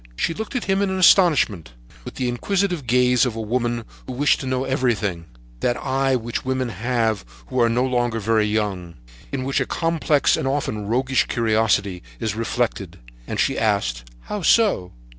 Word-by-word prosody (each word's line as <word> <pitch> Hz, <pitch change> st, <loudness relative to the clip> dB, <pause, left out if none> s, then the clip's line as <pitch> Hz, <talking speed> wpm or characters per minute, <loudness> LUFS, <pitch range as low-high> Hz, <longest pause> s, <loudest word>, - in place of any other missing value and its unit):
She 165 Hz, -, -1 dB
looked 220 Hz, +7 st, -6 dB
at 250 Hz, -, -1 dB
him 195 Hz, 0 st, +1 dB
in 200 Hz, -, +1 dB
astonishment, 170 Hz, -, +3 dB, 0.3 s
with -, -, -9 dB
the 125 Hz, -, -2 dB
inquisitive 175 Hz, -, -1 dB
gaze 125 Hz, 0 st, +3 dB
of 125 Hz, -4 st, 0 dB
women 120 Hz, +1 st, -2 dB, 0.2 s
who 130 Hz, -, -5 dB
wish 140 Hz, +3 st, +3 dB
to 135 Hz, -, -5 dB
know 130 Hz, 0 st, 0 dB
everything, 110 Hz, -10 st, -1 dB, 0.3 s
that 120 Hz, -, 0 dB
eye 135 Hz, 0 st, 0 dB
which 120 Hz, -1 st, -3 dB
women 130 Hz, -1 st, -1 dB
have 115 Hz, 0 st, -1 dB, 0.3 s
who 130 Hz, -, 0 dB
are 115 Hz, -, +4 dB
no 120 Hz, +2 st, +1 dB
longer 120 Hz, -3 st, 0 dB
very 110 Hz, 0 st, +2 dB
young,—in 90 Hz, -, -4 dB
which 135 Hz, +1 st, 0 dB
a 135 Hz, -, -1 dB
complex, 165 Hz, -3 st, +1 dB
and -, -, -2 dB
often 125 Hz, -7 st, -2 dB
roguish, 130 Hz, +3 st, +1 dB
curiosity 110 Hz, -5 st, +1 dB, 0.2 s
is 110 Hz, -, -2 dB
reflected, 115 Hz, +1 st, -2 dB, 0.3 s
and -, -, -4 dB
she -, -, +1 dB
asked: -, -, 0 dB, 0.2 s
"How 210 Hz, -, -5 dB
so?" 185 Hz, -, +3 dB
120 Hz, 165 wpm, -22 LUFS, 110-135 Hz, 0.3 s, are